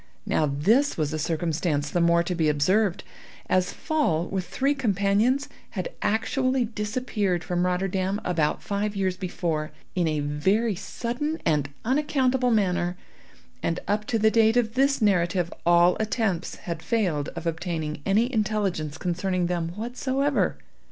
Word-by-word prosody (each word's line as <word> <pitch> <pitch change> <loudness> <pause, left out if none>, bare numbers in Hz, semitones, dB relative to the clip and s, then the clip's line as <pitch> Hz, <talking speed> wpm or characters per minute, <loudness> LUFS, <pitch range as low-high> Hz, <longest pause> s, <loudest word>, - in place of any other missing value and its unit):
Now 155 - +1
this 215 - +2
was 155 -1 -1
a 155 - -2
circumstance 155 -2 -1
the 175 - +1
more 170 0 +4
to 180 - -2
be 160 -3 +2
observed, 185 +7 +2 0.4
as 185 -1 +2
Pfaall, 180 - 0
with 190 -2 -2
three 275 +2 +1
companions, 225 +2 +1 0.3
had - - -2
actually 255 +3 +1
disappeared 210 -4 -2
from 180 0 0
Rotterdam 190 +2 0
about 160 -4 0
five 205 0 -2
years 190 -2 0
before, 175 -4 -2 0.2
in 175 -3 +1
a 155 -1 0
very 190 +11 +1
sudden 245 - -3
and 150 -3 +1 0.2
unaccountable 265 -1 +2
manner, 180 -5 +1 0.6
and 165 +1 -1
up 210 +1 0
to 225 - 0
the 220 0 +4
date 225 +1 +4
of 225 -2 +1
this 275 -1 +2
narrative 175 -3 +2
all 175 +1 +5
attempts 215 -5 -1
had 170 -2 -4
failed 175 -12 0
of 170 0 -6
obtaining 160 -2 -3
any 225 - +2
intelligence 200 - -1
concerning 180 0 -1
them 170 -1 -1
whatsoever. 260 +5 0
190 Hz, 145 wpm, -26 LUFS, 170-225 Hz, 0.6 s, all